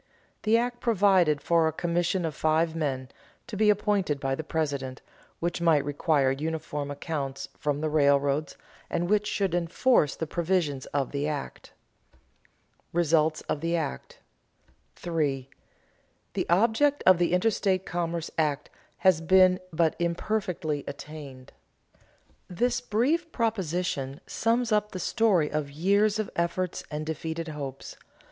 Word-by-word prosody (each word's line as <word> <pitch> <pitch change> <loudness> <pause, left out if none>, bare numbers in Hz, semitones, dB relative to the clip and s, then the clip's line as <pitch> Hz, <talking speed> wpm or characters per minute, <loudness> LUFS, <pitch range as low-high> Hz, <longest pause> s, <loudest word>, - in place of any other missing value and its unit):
The 220 +1 +3
act 240 +1 -1
provided 190 - +3
for 165 +1 +3
a - - +1
commission 175 +2 0
of 160 - -2
five 160 +2 +1
men, 135 -5 -2 0.4
to 215 - -7
be 210 +1 +3
appointed 205 -7 +1
by 135 -1 -1
the 160 - -3
President, 140 -5 -2 0.4
which 170 0 -2
might 160 -4 +3
require 145 -2 +2
uniform 150 0 -3
accounts 145 -2 -4
from 145 0 -2
the 155 - 0
railroads, 140 -1 +2 0.3
and 175 +1 -1
which 210 +1 +2
should 195 -4 0
enforce 175 - +2
the 160 - -3
provisions 160 -4 -1
of 140 -2 -2
the 145 +1 -1
act. 150 -2 -6 0.4
[Sidenote: 60 -1 -37
Results 160 -2 +2
of 145 - -3
the 170 +1 0
act] 110 - -4 0.8
3. 145 -6 -2 0.9
The - - -2
object 230 +10 +3
of 185 -2 +6
the 175 - +2
Interstate 190 0 +1
Commerce 170 -1 -3
Act 150 -2 0 0.3
has 185 -4 +3
been 185 +2 +5
but 160 0 +1
imperfectly 170 -4 -1
attained. 140 -2 -9 0.9
This 245 +7 0
brief 285 +9 0
proposition 180 - -2
sums 230 +1 0
up 210 0 +1
the 185 - -4
story 190 -6 +2
of 150 -2 -2
years 200 +8 +2
of 215 -2 -3
efforts 170 +1 -1
and 150 0 -4
defeated 160 +1 -4
hopes. 140 -3 -7
165 Hz, 135 wpm, -27 LUFS, 150-190 Hz, 0.9 s, of